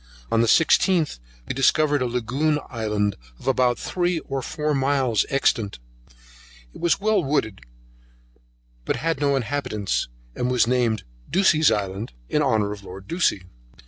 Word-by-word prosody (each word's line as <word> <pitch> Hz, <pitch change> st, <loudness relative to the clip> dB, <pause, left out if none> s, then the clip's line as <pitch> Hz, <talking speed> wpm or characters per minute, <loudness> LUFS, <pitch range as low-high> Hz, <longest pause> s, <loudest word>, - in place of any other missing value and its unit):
On 115 Hz, 0 st, +3 dB
the 115 Hz, -, +2 dB
16th 165 Hz, -, +3 dB, 0.3 s
we -, -, -2 dB
discovered 145 Hz, +2 st, +3 dB
a 125 Hz, -, +1 dB
Lagoon 125 Hz, +6 st, 0 dB
Island 105 Hz, -4 st, -1 dB, 0.2 s
of -, -, -14 dB
about 125 Hz, -2 st, +2 dB
three 175 Hz, -1 st, -1 dB
or 135 Hz, -1 st, -4 dB
four 150 Hz, +3 st, -2 dB
miles 135 Hz, -5 st, +1 dB
extent; 115 Hz, -, 0 dB, 1.0 s
it -, -, -12 dB
was 170 Hz, +2 st, +2 dB
well 210 Hz, -2 st, +2 dB
wooded, 120 Hz, -8 st, -1 dB, 1.2 s
but -, -, -1 dB
had 165 Hz, -3 st, -1 dB
no 140 Hz, -1 st, +2 dB
inhabitants, 120 Hz, -6 st, -2 dB, 0.3 s
and 125 Hz, -, -1 dB
was 125 Hz, -2 st, +3 dB
named 120 Hz, -3 st, +1 dB, 0.3 s
Ducie's 170 Hz, -5 st, +4 dB
Island, 100 Hz, -, -2 dB, 0.2 s
in 150 Hz, -, +1 dB
honour 110 Hz, -7 st, +1 dB
of 105 Hz, -1 st, -8 dB
Lord 95 Hz, 0 st, -10 dB
Ducie. 165 Hz, -, +1 dB
130 Hz, 145 wpm, -23 LUFS, 110-150 Hz, 1.2 s, Ducie's